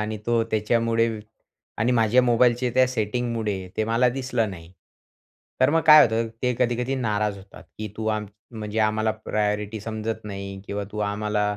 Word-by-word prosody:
आणि 110 0 -3
तो 120 -1 +2
त्याच्यामुळे 115 +1 +1 0.7
आणि 115 +4 +2
माझ्या 120 +1 +4
मोबाईलचे 120 0 +3
त्या 130 0 +5
सेटिंगमुळे 110 -4 -2
ते 110 - +1
मला 115 +3 +2
दिसलं 125 -4 -1
नाही. 85 -1 -11 0.9
तर 130 +2 +5
मग 165 - +3
काय 155 0 +10
होतं, 115 0 +1
ते 125 -1 +1
कधी-कधी 125 +2 0
नाराज 105 -4 -1
होतात. 100 +1 -14 0.2
की 110 0 -4
तू 110 0 -4
आम 110 -1 -1 0.2
म्हणजे 110 -2 -5
आम्हाला 110 0 +1
प्रायॉरिटी 105 0 -2
समजत 110 0 -4
नाही 100 -1 -6
किंवा 100 0 -3
तू 105 - -6
आम्हाला 105 0 -1
110 Hz, 160 wpm, -24 LUFS, 105-120 Hz, 0.9 s, काय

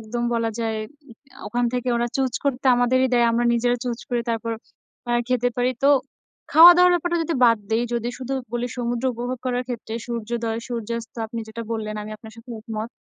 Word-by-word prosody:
একদম 230 +2 -4
বলা 230 -1 0
যায়, 225 -1 -1 0.7
ওখান 240 +3 0
থেকে 250 0 -2
ওরা 240 0 +1
চুজ 265 -2 0
করতে 270 -1 -1
আমাদেরই 255 +2 +3
দেয়। 240 -1 +4
আমরা 235 +1 +1
নিজেরা 245 +1 +2
চুজ 240 -2 -2
করে 245 -1 0
তারপর 230 0 -2 0.6
আ - - +1 0.2
খেতে 245 -1 +2
পারি। 245 +1 +2
তো - - +6 0.6
খাওয়া-দাওয়ার 355 +2 +9
ব্যাপারটা 345 0 0
যদি 330 +1 -2
বাদ 230 -2 +5
দেই, 225 +2 +2
যদি 235 0 -1
শুধু 260 +1 -5 0.2
বলি 240 0 -1
সমুদ্র 240 0 -2
উপভোগ 245 +2 -4
করার 250 0 0
ক্ষেত্রে 230 -2 -5
সূর্যোদয়, 230 -1 -3
সূর্যাস্ত 235 -1 -4
আপনি 230 +1 -5
যেটা 230 +1 -6
বললেন 215 -1 -3
আমি 215 - -8
আপনার 220 0 -13
সাথে 230 +2 -13
একমত। 220 0 -5
240 Hz, 185 wpm, -23 LUFS, 230-250 Hz, 0.7 s, খাওয়া-দাওয়ার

